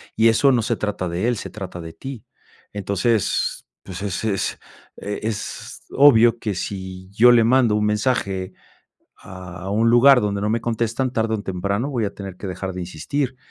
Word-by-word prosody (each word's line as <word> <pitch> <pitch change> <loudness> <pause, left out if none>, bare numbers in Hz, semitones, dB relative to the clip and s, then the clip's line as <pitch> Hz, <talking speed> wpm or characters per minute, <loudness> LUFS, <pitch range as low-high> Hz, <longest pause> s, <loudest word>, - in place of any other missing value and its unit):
y 115 +1 +5
eso 135 +5 +4
no 125 -3 +2
se 115 +1 -1
trata 100 -4 -3
de 90 +6 -1
él, 120 - +1
se - - -6
trata 95 -4 -7
de 80 - -8
ti, 130 +6 -8 0.5
entonces 100 +2 0 0.2
pues 95 -1 -8
es 100 -1 -3
es 100 -3 -1 0.4
e 105 0 -5
es 110 -1 -5
obvio, 120 -4 +6
que 105 -3 -2
si 95 0 -6
yo 120 +4 +6
le 115 -1 +5
mando 120 -2 +3
un 105 0 +1
mensaje 100 -4 -1 0.7
a 90 0 -8
un 110 +3 +2
lugar 125 +3 +7
donde 100 -2 -1
no 105 +1 -1
me 115 +1 0
contestan 120 +2 -1
tarde 110 -2 0
o 105 - -6
temprano 100 +6 -2
voy 120 -5 -1
a - - -5
tener 95 -2 -8
que 100 - -7
dejar 95 +1 -4
de 90 - -6
insistir, 125 - -3
105 Hz, 185 wpm, -22 LUFS, 95-115 Hz, 0.7 s, lugar